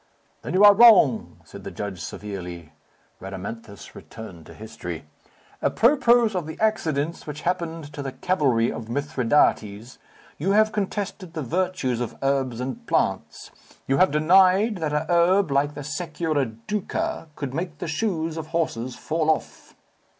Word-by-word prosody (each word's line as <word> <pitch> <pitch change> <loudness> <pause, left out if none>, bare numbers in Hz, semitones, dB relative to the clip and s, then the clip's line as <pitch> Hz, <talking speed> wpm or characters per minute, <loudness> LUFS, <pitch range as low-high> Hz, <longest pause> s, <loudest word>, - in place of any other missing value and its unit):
"Then - - -4
you 195 - +5
are 205 0 +10
wrong," 200 - +5
said - - -12
the - - -6
judge 100 -3 -6
severely. 90 -6 -7 0.5
Rhadamanthus 100 +3 -8
returned 90 -8 -11
to - - -12
history. 90 -7 -7 0.6
"Apropos 240 -3 +3
of 175 -4 -2
the 160 +1 -8
accidents 165 -9 -1
which 150 0 -6
happened 165 -4 -3
to 145 - -6
the 135 -1 -4
cavalry 130 -10 +1
of 115 0 -7
Mithridates, 120 -4 0 0.4
you 190 +7 +1
have 215 +1 +4
contested 200 -3 -4
the 155 - -3
virtues 165 -5 -1
of 120 - -5
herbs 135 -3 0
and 130 +1 -5
plants. - - -1 0.4
You 135 - +2
have 185 - +5
denied 185 +7 +4
that 160 -3 -2
a 150 0 0
herb 175 0 +3
like 145 +2 +1
the 145 - -6
securiduca, 160 - -3
could 140 -3 -5
make 165 0 -4
the 175 - -5
shoes 165 -2 -2
of 160 -1 -5
horses 130 -7 -2
fall 160 0 -1
off." 160 - -2
155 Hz, 145 wpm, -24 LUFS, 125-185 Hz, 0.6 s, are